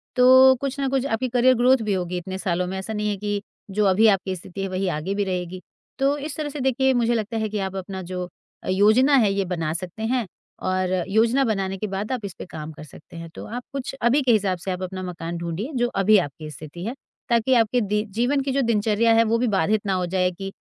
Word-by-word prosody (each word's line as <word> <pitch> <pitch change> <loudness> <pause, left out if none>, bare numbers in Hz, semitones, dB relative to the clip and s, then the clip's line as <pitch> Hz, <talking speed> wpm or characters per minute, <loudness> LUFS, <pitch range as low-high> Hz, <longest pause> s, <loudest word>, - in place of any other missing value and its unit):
तो 260 +1 +7
कुछ 275 0 -3
ना 275 - 0
कुछ 270 0 0
आपकी 255 -1 -1
करियर 250 +1 +4
ग्रोथ 250 +2 +4
भी - - +2
होगी 180 -1 -2
इतने 185 +2 -5
सालों 180 -2 -1
में 190 +1 -4
ऐसा 190 +3 -5
नहीं 210 0 -1
है 205 - -2
कि 205 0 -2 0.3
जो 210 +2 +1
अभी 200 +3 +5
आपकी 195 -2 +1
स्थिति 185 +2 -8
है, 195 - -1
वही 185 +1 -2
आगे 160 +6 -3
भी 205 - +1
रहेगी। 180 -1 -4 0.4
तो 275 +2 +2
इस 295 +1 -5
तरह 305 -1 -3
से 290 0 -7
देखिए, 265 0 +2
मुझे 240 -1 +2
लगता 225 0 -2
है 220 -1 -1
कि 210 0 -3
आप 190 -1 -3
अपना 190 0 -5
जो 180 0 -5 0.4
अ, - - -9
योजना 215 +9 +4
है 215 -6 +4
ये 195 -1 0
बना 165 -4 -2
सकते 180 +5 -6
हैं 240 +1 0 0.3
और 185 0 -1 0.2
योजना 230 +6 +3
बनाने 195 -4 -1
के 215 - -3
बाद 200 +3 -4
आप 245 -5 -3
इस 195 - -6
पे - - -6
काम 155 -1 -7
कर 155 - -11
सकते 155 +2 -14
हैं 165 0 -8
तो - - -7
आप 245 +3 -6
कुछ 275 -2 -4
अभी 240 +5 +3
के 255 - +3
हिसाब 195 -4 +2
से 190 - -4
आप 180 0 -4
अपना 185 0 -5
मकान 170 -1 -5
ढूँढिए 170 - -4
जो 240 -1 +2 0.2
अभी 215 +2 +6
आपकी 155 -3 -3
स्थिति 155 +4 -9
है, 230 - -3 0.4
ताकि 235 +2 +3
आपके 235 +1 +3
दी 210 0 0 0.2
जीवन 275 +4 +2
की 270 0 -2
जो 275 +1 +1
दिनचर्या 220 +1 +2
है 225 0 +5
वे 230 +1 +1
भी 250 - +1
बाधित 205 +1 +1
ना 195 - 0
हो 185 -1 0
जाए 180 0 +1
कि 195 +2 -7
205 Hz, 255 wpm, -23 LUFS, 185-240 Hz, 0.4 s, तो